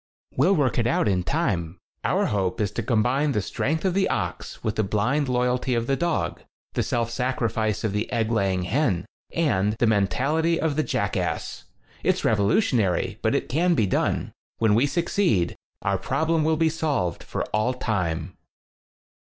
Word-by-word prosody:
"We'll 195 - +4
work 140 -6 +1
it 115 - +2
out 120 - +2
in 95 -3 +2
time. 90 - -1 0.3
Our - - +2
hope 95 0 -1
is 105 -2 0
to - - -3
combine 130 +5 +1
the 105 - +1
strength 155 - -1
of 185 - +2
the 195 0 +2
ox - - -3
with 110 0 -1
the 110 - +1
blind 120 +8 0
loyalty 125 0 +1
of 115 0 0
the 135 - +1
dog, 170 +2 -1 0.3
the - - 0
self 115 -1 -1
sacrifice 115 -4 -1
of 110 -3 -1
the 105 +4 -2
egg 115 -2 0
laying 95 -5 +1
hen 110 - 0 0.3
and 105 - +1
the 115 - +1
mentality 135 - +1
of 160 -3 0
the 155 - +2
jackass. - - -2 0.4
It's - - +1
revolutionary, 105 - +2
but - - +1
it - - -1
can 170 +6 +2
be 110 - +3
done. 95 - 0 0.3
When 110 -2 +3
we 120 +7 +4
succeed, 155 - +1 0.3
our 100 -1 +1
problem 155 - 0
will 160 0 +2
be 165 0 +3
solved 145 - -1
for - - -3
all 115 +4 +1
time." 95 -10 -2
120 Hz, 170 wpm, -25 LUFS, 105-150 Hz, 0.4 s, We'll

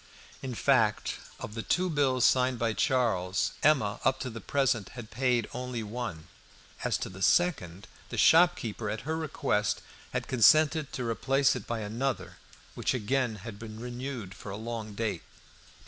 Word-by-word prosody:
In 130 -2 -5
fact, 115 -5 +2 0.2
of 105 - -7
the 115 - -4
two 180 +10 +1
bills 140 -6 +2
signed 130 -1 +3
by 115 -1 0
Charles, 100 -6 +1
Emma 130 -9 +3
up 130 - +2
to 130 - -4
the 115 0 -8
present 130 -5 0
had 115 -2 -8
paid 125 -1 +1
only 125 -2 -4
one. 105 -8 -5 0.6
As - - +1
to - - -4
the 95 +1 -10
second, 100 - +1 0.2
the - - -5
shopkeeper, 140 - +4
at 110 +1 -3
her 160 +5 -2
request, 105 -9 -1 0.3
had - - -3
consented 150 +5 +4
to 125 -2 -3
replace 135 +4 +2
it 125 - -6
by 115 -1 -2
another, 115 +3 -3 0.4
which - - -1
again 125 0 0
had 110 -3 -7
been 110 -1 -8
renewed 120 -4 -5
for 100 - -10
a 95 - -4
long 110 -2 -5
date. 110 0 -2
120 Hz, 160 wpm, -29 LUFS, 110-135 Hz, 0.6 s, shopkeeper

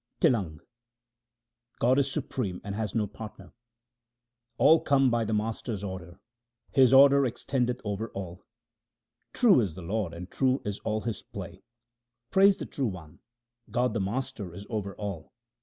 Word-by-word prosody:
TlLANG 90 -11 +1 1.2
God 130 +3 +3
is 140 -1 0
supreme 125 - -3
and 100 - -5
has 105 -1 -3
no 110 -2 +2
partner: 100 -3 -10 0.5
— 120 0 -56
All 150 +6 +6
come 135 -2 +3
by 120 -1 +1
the 110 - -3
Master's 110 -1 -3
order; 90 -3 -7 0.5
His 130 -3 +5
order 140 +1 +7
extendeth 125 0 -1
over 105 +1 -3
all. 90 -1 -7 0.9
True 230 - +5
is 95 -8 -2
the 90 - -8
Lord, 100 0 -2
and 90 +2 -8
true 130 0 +2
is 105 -1 -3
all 110 -1 -2
His 110 -3 -4
play. - - -9 0.7
Praise 195 0 +5
the - - -5
True 135 -3 -2
One; 85 -7 -8 0.5
God 125 -1 +1
the 115 - -1
Master 100 -3 -4
is 100 - -9
over 100 -3 -3
all. 100 -6 -6
110 Hz, 155 wpm, -28 LUFS, 100-130 Hz, 1.2 s, order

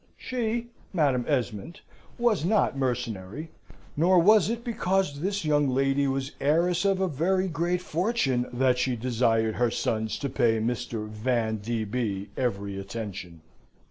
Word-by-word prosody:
She, 235 -1 -2 0.2
Madam 140 -8 +2
Esmond, 125 - -2 0.4
was 235 -9 +2
not 200 -3 +2
mercenary, 125 - -3 0.4
nor 180 +5 +4
was 205 +3 +6
it 235 +1 -3
because 190 -9 0
this 195 +2 -2
young 145 -2 +3
lady 135 +2 +2
was 135 0 -2
heiress 170 +5 +2
of 195 -1 +2
a 190 - +2
very 185 +5 +1
great 175 +2 -1
fortune 155 - 0
that 125 0 +2
she 125 0 +1
desired 115 -2 +1
her 120 -1 +3
sons 110 -1 -1
to 140 - -3
pay 115 -3 +2
Mr. 115 -1 -2
Van 110 0 -1
d. 110 +2 -2
B. 100 -3 -3
every 100 -6 -2
attention. 95 -5 -7
135 Hz, 140 wpm, -27 LUFS, 115-180 Hz, 0.4 s, was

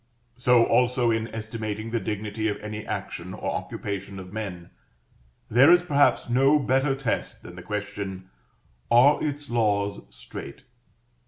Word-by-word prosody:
So 125 -1 +4
also 125 0 +2
in 110 0 -1
estimating 110 0 -5
the 115 - 0
dignity 105 +1 -3
of 105 -1 -1
any 105 0 -7
action - - -5
or - - -3
occupation 100 -1 -5
of 95 0 -9
men, 95 -6 -6 0.8
there 130 +8 +6
is 175 0 +6
perhaps 145 -5 +3
no 135 +5 +4
better 135 0 +1
test 135 -4 -3
than 90 - -10
the 90 - -9
question 100 -1 -5 0.6
"are 125 +5 +5
its 145 -1 -3
laws 100 -3 +1
strait?" - - -10
110 Hz, 140 wpm, -25 LUFS, 105-125 Hz, 0.8 s, there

